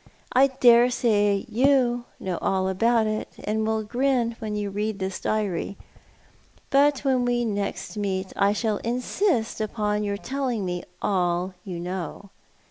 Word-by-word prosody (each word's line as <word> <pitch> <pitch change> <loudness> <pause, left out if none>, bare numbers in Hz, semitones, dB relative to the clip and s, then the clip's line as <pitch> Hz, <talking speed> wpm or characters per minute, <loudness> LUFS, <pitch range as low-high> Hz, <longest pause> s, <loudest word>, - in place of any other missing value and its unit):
I 265 +2 +6
dare 245 -2 +5
say 205 -5 +2
you 245 -1 +2
know 185 -2 -3
all 190 -1 +1
about 225 +4 +2
it, 215 0 -2
and 215 +1 -1
will 220 -1 0
griu 245 0 +1
when 215 -2 -4
you 205 -1 -2
read 210 +1 -2
this 190 -1 -3
diary; 200 -3 -2 0.9
biit 285 0 +4
when 245 -4 +1
next 200 +1 -4
we 210 - -3
meet 190 -1 -2
I 200 0 +3
shall 215 0 0
insist 245 - -1
iipon 210 -1 -1
your 200 -1 -2
telling 250 -3 -2
me 180 -1 -2 0.2
all 180 -1 0
you 180 -3 -6
know. 180 +2 -5
215 Hz, 145 wpm, -25 LUFS, 200-240 Hz, 0.9 s, I